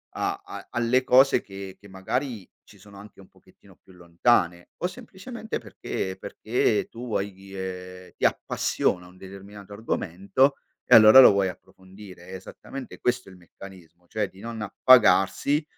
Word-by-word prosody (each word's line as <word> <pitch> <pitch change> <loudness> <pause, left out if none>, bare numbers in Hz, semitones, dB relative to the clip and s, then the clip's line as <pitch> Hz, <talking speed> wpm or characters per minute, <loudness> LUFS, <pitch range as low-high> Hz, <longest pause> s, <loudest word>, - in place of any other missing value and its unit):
a - - -3
a - - -10
alle 120 +2 +1
cose 135 +2 +4
che 95 -1 -10
che 100 - -17
magari 105 +3 -4
ci - - -19
sono 100 -1 -16
anche 105 -1 -15
un 95 - -15
pochettino - - -23
più 95 - -23
lontane 85 0 0
o 180 - -2
semplicemente 225 +1 -8
perché 95 0 -5
perché 110 +1 -1
tu 120 +2 -9
vuoi 100 -3 -3
dire 95 -1 -9
ti - - -10
appassiona 90 0 -1
un 90 +1 -18
determinato 100 +1 -12
argomento 105 - 0 0.3
e - - +6
allora 110 +3 +9
lo 125 - +9
vuoi 95 -1 +1
approfondire, 95 -1 -14
è 95 - -8
esattamente 130 +7 -10
questo 125 0 -1
il 95 - -14
meccanismo, 90 -1 -15
cioè 105 +1 -3
di 95 - -19
non 115 +1 -7
appagarsi 110 - +4
100 Hz, 150 wpm, -25 LUFS, 95-120 Hz, 0.3 s, allora